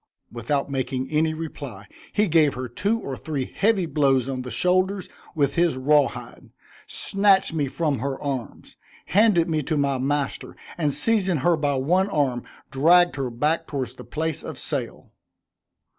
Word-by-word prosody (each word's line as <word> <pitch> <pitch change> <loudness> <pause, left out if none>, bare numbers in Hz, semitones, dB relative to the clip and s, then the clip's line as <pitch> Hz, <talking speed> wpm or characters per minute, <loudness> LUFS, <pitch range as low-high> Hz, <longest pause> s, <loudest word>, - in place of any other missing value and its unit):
Without 120 +4 -1
making 130 -1 -3
any 155 +1 +2
reply, 140 -10 -7 0.3
he 210 0 +2
gave 155 -4 +3
her 130 0 -4
two 205 - -1
or 135 -10 -5
three 140 -2 -4
heavy 200 -3 +2
blows 135 -5 +2
on 130 -1 -3
the 125 - -7
shoulders 185 - +1 0.3
with 140 -3 +1
his 170 -5 +2
raw 145 +2 +4
hide, - - -10 0.4
snatched 195 -3 +2
me 150 -3 0
from 145 -1 -1
her 135 +1 -3
arms, 135 -5 -6 0.3
handed 195 -4 +3
me 155 -2 0
to 150 +2 -2
my 140 -2 +1
master, 140 +1 -2 0.2
and 150 -4 0
seizing 195 0 +1
her 175 -1 +5
by 145 -2 0
one 180 +9 +1
arm, 135 -8 0 0.3
dragged 175 +6 +4
her 135 -3 -2
back 150 +8 -1
towards 130 -4 -3
the - - -11
place 160 -1 -3
of - - -7
sale. - - -4
150 Hz, 160 wpm, -24 LUFS, 135-175 Hz, 0.4 s, her